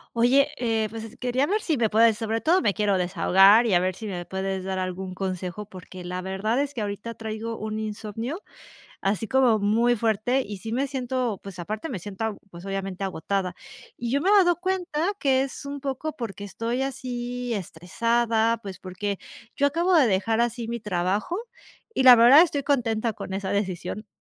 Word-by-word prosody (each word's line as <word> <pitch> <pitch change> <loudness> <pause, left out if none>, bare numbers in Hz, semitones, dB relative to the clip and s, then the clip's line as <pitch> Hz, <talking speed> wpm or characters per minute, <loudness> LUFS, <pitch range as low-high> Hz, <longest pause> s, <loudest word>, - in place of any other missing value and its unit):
Oye, 265 +5 +4
eh, 225 -3 0
pues 225 +1 -7
es 225 +2 -11
quería 250 +2 0
ver 420 +5 0
si 315 -7 0
me 230 -2 +2
puedes 220 0 +4
sobre 225 0 -2
todo 360 +4 +3
me 200 - +2
quiero 205 -2 +1
desahogar 195 +5 +5
y 190 - +3
a - - +5
ver 185 +1 0
si 215 +4 -7
me 180 -3 -5
puedes 190 0 -3
dar 190 0 -2
algún 185 0 -4
consejo, 185 +1 -4
porque 185 0 -10
la 180 +1 -4
verdad 195 +6 -1
es 285 0 -1
que 240 - -4
ahorita 205 +3 -4
traigo 225 0 -5
un 215 0 -4
insomnio, 220 - -5 0.6
así 205 +3 -1
como 260 -4 +4
muy 230 +4 +2
fuerte, 225 +4 +1
y 205 -5 -5
sí 225 +4 -6
me 265 +4 0
siento 255 -5 -2
pues 195 -3 -9
aparte 215 - -4
me 225 - -3
siento 200 +4 -6
ag 220 -2 -2
pues 175 0 -11
obviamente 195 -1 -4
agotada 190 0 -2 0.4
y 235 -1 -3
yo 280 +3 +1
me 380 - +3
he - - +5
dado 360 -4 +5
cuenta 360 -1 -1
que 265 -2 +3
es 275 +1 -6
un 280 0 -5
poco 280 +3 -4
porque 210 -4 -6
estoy 230 +5 -3
así 245 -2 -3
estresada. 225 +5 0
Pues 195 -3 -7
porque 195 +2 -4 0.4
yo 285 - +3
acabo 335 +6 +1
de 305 -6 +6
dejar 220 +3 +1
así 235 -1 -1
mi 235 0 -3
trabajo 200 - -1 0.6
y 340 - +1
la 255 -1 +10
verdad, 240 +6 +8
estoy 295 -5 0
contenta 235 -5 0
con 190 - -7
esa 195 -1 -3
decisión. 200 +1 -3
225 Hz, 195 wpm, -25 LUFS, 195-255 Hz, 0.6 s, la